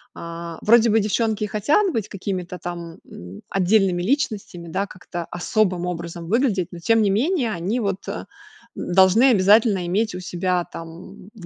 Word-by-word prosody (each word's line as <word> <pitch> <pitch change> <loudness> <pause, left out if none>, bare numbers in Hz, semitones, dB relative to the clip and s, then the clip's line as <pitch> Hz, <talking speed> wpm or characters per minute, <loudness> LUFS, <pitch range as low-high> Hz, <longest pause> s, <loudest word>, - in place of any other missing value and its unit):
а, 170 0 -7
вроде 230 +1 +5
бы 220 +1 +4
девчонки 215 +1 0
и - - -1
хотят 290 - +2
быть 225 - -2
какими-то 185 -2 -5
там, 170 -1 -7
м, 90 +2 -11
отдельными 190 -1 +2
личностями, 210 - -2
да, 195 +5 -2
как-то 175 -2 -7
особым 180 0 0
образом 170 -1 -5
выглядеть, 210 - +1
но, 175 - -9
тем 225 +6 +3
не 205 - +2
менее, 250 - +1
они 195 +6 -2
вот, 200 -3 -3
э, - - -5 0.5
н - - -4
должны 190 +6 +6
обязательно 205 -2 +4
иметь 205 +3 0
у 180 - -6
себя 180 0 -1
там 170 +4 -10
в 195 -6 -11
190 Hz, 170 wpm, -22 LUFS, 175-220 Hz, 0.5 s, должны